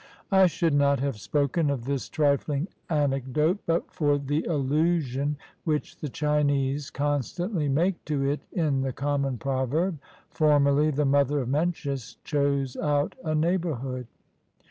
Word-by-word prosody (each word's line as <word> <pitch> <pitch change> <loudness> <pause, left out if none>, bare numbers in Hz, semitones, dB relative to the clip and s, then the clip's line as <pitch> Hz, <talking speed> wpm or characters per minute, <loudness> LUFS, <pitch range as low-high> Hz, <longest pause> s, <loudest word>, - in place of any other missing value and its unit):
I 190 -1 +6
should 165 -2 0
not 140 -1 +3
have 135 -5 -2
spoken 145 - 0
of 130 -4 -2
this 140 -1 -2
trifling 145 +2 +1 0.2
anecdote 145 +3 +1
but 165 0 0
for 145 -2 +2
the 145 +2 -1
allusion 145 -1 0 0.3
which 150 -3 -2
the 150 - -5
Chinese 145 -1 0
constantly 145 - -1
make 170 +6 +1
to 140 -2 0
it 145 +2 0
in 150 -6 +1
the 135 -1 -2
common 140 -1 -1
proverb, 140 - -1 0.2
' - - -31
Formerly 145 -1 +3
the 150 0 0
mother 140 +1 +3
of 125 - -4
Mencius 140 -4 -2
chose 140 -3 0
out 145 0 0
a 155 -2 -1
neighborhood.'" 150 -7 -1
145 Hz, 140 wpm, -26 LUFS, 135-155 Hz, 0.3 s, I